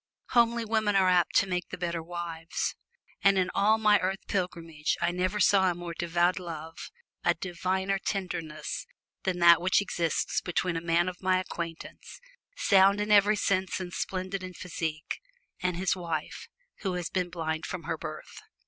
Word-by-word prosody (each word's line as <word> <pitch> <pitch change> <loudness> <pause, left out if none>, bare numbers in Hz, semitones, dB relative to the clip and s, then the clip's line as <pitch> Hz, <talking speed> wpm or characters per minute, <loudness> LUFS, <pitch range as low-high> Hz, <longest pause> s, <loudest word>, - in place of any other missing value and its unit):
Homely 235 -1 +3
women 215 -2 +1
are 190 -1 +5
apt 180 -1 +3
to - - +5
make 180 -1 -2
the 185 - -6
better 170 -2 -2
wives, 165 -1 -4 0.5
and 195 0 +5
in 185 -1 +1
all 215 +2 +4
my 210 -1 +4
earth 190 +1 -2
pilgrimage 165 -5 -2
I 170 0 +1
never 185 +3 -1
saw 190 -2 +5
a 175 - -1
more 175 -1 -6
devoted 175 +2 +1
love 165 -2 -7 0.3
a - - +3
diviner 190 +2 -1
tenderness 165 -6 -4 0.4
than 185 -2 0
that 170 -1 +7
which 185 +1 +3
exists 170 -5 -1
between 180 0 -1
a 165 - -2
man 170 +1 +2
of 180 -1 -5
my 185 -1 +3
acquaintance, 170 -3 -7 0.4
sound 195 0 +5
in 210 +1 -1
every 205 +1 +6
sense 190 -2 0
and 180 -2 -6
splendid 185 +1 -3
in 185 -1 -7
physique, 160 -3 -4 0.4
and 180 -1 0
his 185 +1 +1
wife, 165 -4 -4 0.3
who 190 -3 -2
has 180 -1 -3
been 180 -2 -1
blind 160 -2 -3
from 180 -2 -5
her 165 - -2
birth. 155 0 -8
180 Hz, 170 wpm, -29 LUFS, 170-190 Hz, 0.5 s, that